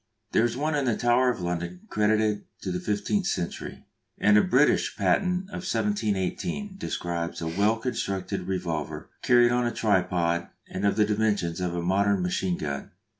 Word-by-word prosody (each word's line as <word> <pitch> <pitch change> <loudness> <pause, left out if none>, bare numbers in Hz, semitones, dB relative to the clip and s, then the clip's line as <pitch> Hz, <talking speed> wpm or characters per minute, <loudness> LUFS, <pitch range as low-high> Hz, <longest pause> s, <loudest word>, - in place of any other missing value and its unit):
There 115 - +4
is 120 +1 -2
one 155 +3 0
in 145 -2 +1
the 120 -4 +1
Tower 125 +1 +3
of 120 -6 -2
London 85 0 -3
credited 105 0 +1 0.2
to 95 - -2
the 90 - -2
fifteenth 175 - -1
century, 85 - -4 0.3
and 105 - +4
a 105 - +7
British - - +3
patent 185 0 +1
of - - -5
1718 105 - -1
describes 85 - -3
a 80 - -3
well 100 +7 +2
constructed 100 -5 -3
revolver 85 -5 -3
carried 120 -1 +5
on 120 0 +2
a - - -1
tripod 90 -6 +1 0.2
and 100 +2 -1
of 100 - +2
the 105 - +4
dimensions 105 -5 0
of 90 -1 -1
a 85 - -2
modern 100 +1 +2
machine 90 0 0
gun. 70 -2 -4
105 Hz, 170 wpm, -27 LUFS, 90-120 Hz, 0.3 s, a